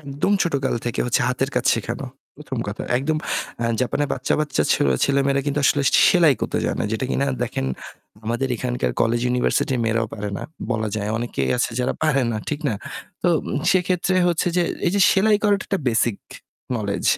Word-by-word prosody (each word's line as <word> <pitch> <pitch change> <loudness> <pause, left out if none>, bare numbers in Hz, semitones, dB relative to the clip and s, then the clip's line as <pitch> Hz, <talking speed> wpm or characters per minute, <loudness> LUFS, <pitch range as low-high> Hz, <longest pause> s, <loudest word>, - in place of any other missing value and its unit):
একদম 140 +7 -1
ছোটকাল 140 -5 0
থেকে 120 - -2 0.3
হাতের 130 +2 -1
কাজ 125 -1 0
শেখানো। 115 +4 -4 0.3
প্রথম 140 -3 -6
কথা। 100 - -5 0.2
একদম 155 +4 -1 0.6
জাপানের 140 +3 0
বাচ্চা 125 - 0
বাচ্চা 150 - 0 0.4
ছেলেমেয়েরা 140 0 +2
কিন্তু 145 0 0
আসলে 145 - +3 0.3
সেলাই 170 -6 +5
করতে - - -1
যায় - - -1
না। - - 0
যেটা 110 - -1
কিনা 140 - +1 0.2
দেখেন 90 - -2 0.6
আমাদের 120 +4 -1
এখানকার 125 +1 -1
কলেজ 115 +1 +2
ইউনিভার্সিটির 125 +1 +1
মেয়েরাও 115 0 +1
পারে 105 -1 -4
না। - - -6 0.3
বলা 110 -2 0
যায়। 105 0 -2
অনেকেই 120 +1 -2
আছে - - +1
যারা 125 - 0
পারেনা। 135 -7 +1
ঠিক 150 0 -2
না? 110 - 0 0.5
তো - - +3 0.4
সেক্ষেত্রে 185 0 +1
হচ্ছে 170 0 0
যে, 175 - +4 0.2
এই 170 - +2
যে 200 - +2
সেলাই 210 +2 +4
করাটা 205 -1 +2
একটা 195 - -1
বেসিক 115 -2 +1 0.6
নোলেজ, 100 -3 -3
135 Hz, 170 wpm, -22 LUFS, 115-155 Hz, 0.6 s, সেলাই